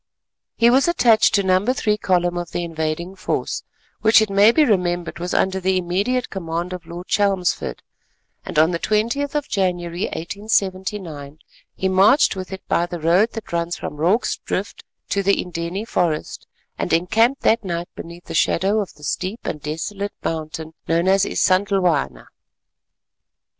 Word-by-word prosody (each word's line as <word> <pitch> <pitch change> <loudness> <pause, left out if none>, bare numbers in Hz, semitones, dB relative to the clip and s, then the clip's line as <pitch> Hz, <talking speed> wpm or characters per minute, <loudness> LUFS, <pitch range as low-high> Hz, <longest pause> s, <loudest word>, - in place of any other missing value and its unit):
He 235 +1 +5
was 265 +5 +4
attached 230 -10 +4
to 200 - +2
No. 185 0 +3
3 225 -3 +1
column 175 -2 +1
of 175 -1 -4
the 175 - -3
invading 165 +2 -3
force, 185 - -2 0.4
which 220 0 +6
it 215 -2 0
may 200 +3 +6
be 305 +5 +4
remembered 175 -6 0
was 175 +1 -4
under 190 0 +1
the 190 0 +1
immediate 200 +8 -1
command 170 -1 -4
of 180 - -8
Lord 175 +1 -8
Chelmsford, 190 - 0 0.6
and - - -6
on 160 +3 +5
the 170 - -2
20th 235 - 0
of 295 -1 -1
January, 175 -2 -1
1879, 185 -5 -3 0.4
he 190 - -1
marched 195 +8 +4
with 185 0 -6
it 190 0 -8
by 175 - +1
the 175 -1 -6
road 175 +8 +3
that 225 -6 -8
runs 170 0 -1
from 150 - -6
Rorke's 180 +10 +1
Drift - - -4 0.3
to 200 - +1
the 200 +1 +3
Indeni 180 +4 -4
forest, 165 -7 -2 0.3
and - - -2
encamped 220 +10 +2
that 225 0 +3
night 175 -2 -4
beneath 170 +1 -10
the - - -7
shadow 195 +5 +2
of 200 - -4
the 150 - -18
steep 185 +8 -3
and 150 - -4
desolate 180 +7 -4
mountain 160 0 -4
known 170 +2 +1
as 195 +1 +4
Isandhlwana. 180 - +1
185 Hz, 160 wpm, -21 LUFS, 170-205 Hz, 0.6 s, which